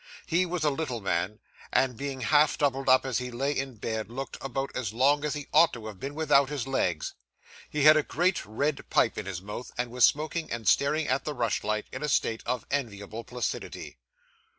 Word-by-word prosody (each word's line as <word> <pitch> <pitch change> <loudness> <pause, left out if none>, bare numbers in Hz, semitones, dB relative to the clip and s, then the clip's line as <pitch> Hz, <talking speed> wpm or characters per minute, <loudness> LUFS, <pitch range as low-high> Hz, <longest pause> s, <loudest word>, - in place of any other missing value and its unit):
He 180 +2 +1
was 175 -2 -2
a 150 - +3
little 135 -5 -3
man, 95 +1 -1 0.3
and, 130 -2 +2
being 135 +1 -5
half 150 +4 +4
doubled 135 -2 +1
up 130 0 +6
as 130 -3 0
he 125 0 -4
lay 135 +4 -1
in 135 -2 -3
bed, 110 0 -4
looked 135 +3 -5
about 135 +1 -3
as 110 -5 -2
long 140 +5 +3
as 150 -1 -1
he 145 -1 -6
ought 160 +2 +6
to 115 -3 -7
have 105 -3 -8
been 140 +2 -5
without 140 -3 +4
his 145 -5 -3
legs. 90 - -1 0.6
He 150 -2 -1
had 155 +1 +9
a 155 - +4
great 180 +5 0
red 140 +7 -2
pipe - - +3
in - - -6
his 95 -2 -5
mouth, 105 +5 -7
and 120 -1 -2
was 125 0 +1
smoking, 155 +2 +2
and 115 -3 -4
staring 145 +6 +3
at 130 +2 +1
the 150 - -4
rush 115 -4 0
light, 110 0 -1
in - - -6
a 150 - -1
state 115 -4 +1
of 125 -1 -1
enviable 110 -5 -3
placidity. 125 +1 -5
135 Hz, 215 wpm, -28 LUFS, 115-145 Hz, 0.6 s, had